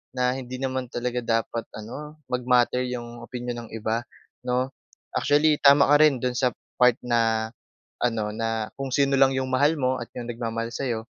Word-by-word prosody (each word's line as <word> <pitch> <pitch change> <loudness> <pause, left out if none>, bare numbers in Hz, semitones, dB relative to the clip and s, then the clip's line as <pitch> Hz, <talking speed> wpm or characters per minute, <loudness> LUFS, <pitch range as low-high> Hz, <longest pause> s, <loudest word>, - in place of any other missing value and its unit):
na 125 0 +2
hindi 130 -1 -6
naman 130 -1 -2
talaga 125 0 -2 0.2
dapat 115 0 -6
ano, 150 +8 -8
mag-matter 125 0 +2
yung 120 -1 -6
opinyon 120 -1 -5
ng - - -19
iba, 115 +1 -1 0.4
'no? 125 +1 +1 0.5
Actually, 150 +1 +3
tama 140 0 +7
ka - - +8
rin 145 -4 +4
do'n 125 -1 0
sa 125 -2 +2 0.3
part 125 -1 +6
na 115 -2 +1 0.5
ano, 115 -3 0
na 115 -1 -2
kung 135 -1 -3
sino 140 -1 +3
lang 135 0 +5
yung 130 0 -1
mahal 145 +5 +3
mo 130 -1 +1
at 120 - -6
yung 120 -1 -5
nagmamahal 115 -1 -3
sa'yo, 120 -2 -2
125 Hz, 170 wpm, -25 LUFS, 115-130 Hz, 0.5 s, ka